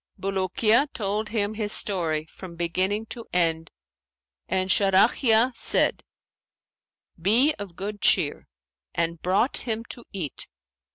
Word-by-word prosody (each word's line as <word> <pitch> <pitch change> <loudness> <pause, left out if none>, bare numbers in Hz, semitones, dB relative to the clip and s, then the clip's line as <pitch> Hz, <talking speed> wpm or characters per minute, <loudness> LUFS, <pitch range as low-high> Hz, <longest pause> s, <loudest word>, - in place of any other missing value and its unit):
Bulukiya 195 +7 +1
told 210 0 -2
him 210 -2 -1
his 210 -1 -2
story 165 -8 0
from 170 +2 -11
beginning 185 +5 -1
to 230 0 -7
end 165 -2 0 0.8
and 185 0 0
Sharahiya 220 +5 +3
said, - - +2 1.2
'Be 240 - +4
of 195 -4 -8
good 205 +2 -6
cheer,' 145 - +2 0.5
and 170 -1 -1
brought 195 +8 +1
him 225 -1 -3
to 240 - -5
eat. 175 -8 -4
195 Hz, 115 wpm, -25 LUFS, 175-220 Hz, 1.2 s, Be